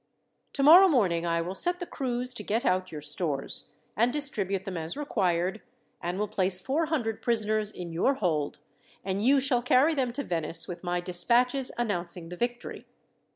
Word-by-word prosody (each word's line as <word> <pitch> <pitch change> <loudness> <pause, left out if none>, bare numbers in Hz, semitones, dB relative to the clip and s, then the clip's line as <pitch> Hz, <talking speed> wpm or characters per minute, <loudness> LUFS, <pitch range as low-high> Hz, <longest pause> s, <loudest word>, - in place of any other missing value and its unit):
"Tomorrow 320 +7 +7
morning 185 - +1
I 170 0 0
will 180 +3 -5
set 355 - +1
the 355 - -4
crews 250 -4 -3
to 215 - -7
get 220 +4 -1
out 185 0 0
your 150 -2 -7
stores, 150 -1 -1 0.3
and 235 +3 +2
distribute 205 -10 0
them 190 -1 -6
as 165 - -4
required, 190 -8 -1 0.4
and 175 +2 -3
will 210 +1 -1
place 190 -3 0
four 290 - -1
hundred 240 -9 -2
prisoners 215 -3 +1
in 175 -4 -8
your 225 +12 +1
hold, 155 - -1 0.5
and 195 +1 -2
you 275 +3 +4
shall 260 -2 +2
carry 255 +6 +3
them 260 -5 -1
to 285 - -3
Venice 165 - 0
with 175 -1 -8
my 175 0 -1
despatches 240 +9 +2
announcing 175 -7 -3
the 180 - -7
victory. 240 +4 -4
210 Hz, 175 wpm, -27 LUFS, 175-255 Hz, 0.5 s, Tomorrow